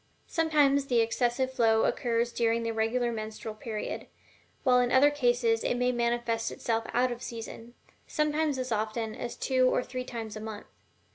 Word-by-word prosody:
Sometimes 290 Hz, -4 st, +2 dB
the 245 Hz, -3 st, +3 dB
excessive 240 Hz, +3 st, +1 dB
flow 225 Hz, -3 st, +3 dB
occurs 235 Hz, -1 st, 0 dB
during 230 Hz, 0 st, +1 dB
the 230 Hz, -, -1 dB
regular 230 Hz, +2 st, 0 dB
menstrual 220 Hz, 0 st, -5 dB
period, 215 Hz, -1 st, -5 dB, 0.6 s
while 250 Hz, -2 st, +5 dB
in 245 Hz, 0 st, +1 dB
other 280 Hz, +3 st, +6 dB
cases 240 Hz, -5 st, +2 dB
it 245 Hz, -, 0 dB
may 250 Hz, 0 st, +2 dB
manifest 235 Hz, -1 st, 0 dB
itself 225 Hz, -1 st, -2 dB
out 250 Hz, +1 st, +2 dB
of 240 Hz, 0 st, -6 dB
season 230 Hz, 0 st, -8 dB, 0.3 s
sometimes 300 Hz, -1 st, 0 dB
as 255 Hz, -1 st, -3 dB
often 220 Hz, +1 st, -1 dB
as 240 Hz, -, -5 dB
two 255 Hz, -1 st, +2 dB
or 250 Hz, -, +1 dB
three 255 Hz, 0 st, -5 dB
times 225 Hz, -4 st, -6 dB
a -, -, -5 dB
month. 220 Hz, -1 st, -7 dB
240 Hz, 165 wpm, -29 LUFS, 225-255 Hz, 0.6 s, other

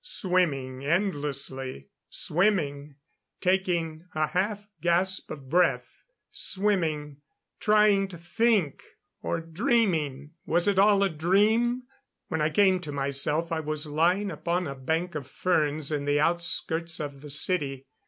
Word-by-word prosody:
Swimming 170 Hz, -, -1 dB
endlessly... 140 Hz, -, -2 dB, 0.2 s
swimming... 150 Hz, -6 st, 0 dB, 0.4 s
taking 175 Hz, -4 st, 0 dB
a 155 Hz, 0 st, +2 dB
half 205 Hz, +5 st, -2 dB
gasp 180 Hz, +2 st, +1 dB
of 135 Hz, -3 st, -8 dB
breath... 175 Hz, +5 st, +1 dB, 0.3 s
swimming... 160 Hz, -8 st, 0 dB, 0.4 s
trying 210 Hz, -2 st, +4 dB
to 185 Hz, -3 st, -10 dB
think... 190 Hz, -, +1 dB, 0.4 s
or -, -, -2 dB
dreaming... 165 Hz, -, 0 dB
was 175 Hz, +3 st, +1 dB
it 200 Hz, -2 st, +3 dB
all 200 Hz, 0 st, +5 dB
a 195 Hz, -, +2 dB
dream?... 210 Hz, +9 st, +2 dB, 0.5 s
When 160 Hz, -2 st, -1 dB
I 150 Hz, -, +2 dB
came 190 Hz, +2 st, +3 dB
to 155 Hz, -4 st, -7 dB
myself 145 Hz, +4 st, 0 dB
I 165 Hz, -, 0 dB
was 155 Hz, 0 st, -3 dB
lying 175 Hz, +7 st, +1 dB
upon 170 Hz, +3 st, -1 dB
a 140 Hz, -, -4 dB
bank 160 Hz, +7 st, -2 dB
of 145 Hz, -4 st, -5 dB
ferns 155 Hz, -2 st, 0 dB
in 145 Hz, -2 st, -1 dB
the 145 Hz, 0 st, +2 dB
outskirts 170 Hz, 0 st, 0 dB
of 140 Hz, -2 st, -6 dB
the 150 Hz, -, -9 dB
city. 140 Hz, -3 st, -1 dB
165 Hz, 130 wpm, -27 LUFS, 145-190 Hz, 0.5 s, all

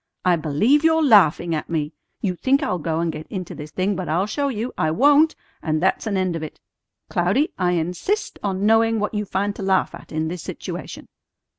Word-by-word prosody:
I 180 Hz, -1 st, +5 dB
believe 170 Hz, -, +2 dB
you're 320 Hz, 0 st, +4 dB
laughing 185 Hz, -, +5 dB
at 155 Hz, -, -3 dB
me! 155 Hz, -2 st, -2 dB, 0.3 s
You 190 Hz, -3 st, 0 dB
think 275 Hz, -, +1 dB
I'll 180 Hz, -9 st, -1 dB
go 160 Hz, +1 st, -1 dB
and 170 Hz, -1 st, 0 dB
get 155 Hz, 0 st, -8 dB
into 185 Hz, -4 st, -6 dB
this 150 Hz, 0 st, -8 dB
thing, 190 Hz, +5 st, -1 dB
but 185 Hz, -2 st, -4 dB
I'll 175 Hz, +5 st, +1 dB
show 280 Hz, +7 st, -1 dB
you. 240 Hz, -1 st, -3 dB
I 155 Hz, -, 0 dB
won't! 290 Hz, -, +4 dB, 0.3 s
And 155 Hz, -1 st, 0 dB
that's 190 Hz, +5 st, 0 dB
an 200 Hz, -3 st, 0 dB
end 185 Hz, -2 st, 0 dB
of 165 Hz, -, -4 dB
it. 155 Hz, -, -8 dB, 0.5 s
Cloudy, 200 Hz, -, +1 dB
I 180 Hz, -1 st, +2 dB
insist 180 Hz, -, -2 dB
on 195 Hz, -1 st, -1 dB
knowing 225 Hz, +1 st, +3 dB
what 210 Hz, +1 st, -2 dB
you 210 Hz, -1 st, -2 dB
find 200 Hz, +1 st, -2 dB
to -, -, -6 dB
laugh 190 Hz, -2 st, +1 dB
at 170 Hz, -, -12 dB
in 160 Hz, 0 st, -1 dB
this 175 Hz, +1 st, -5 dB
situation." -, -, -7 dB
185 Hz, 210 wpm, -22 LUFS, 165-225 Hz, 0.5 s, I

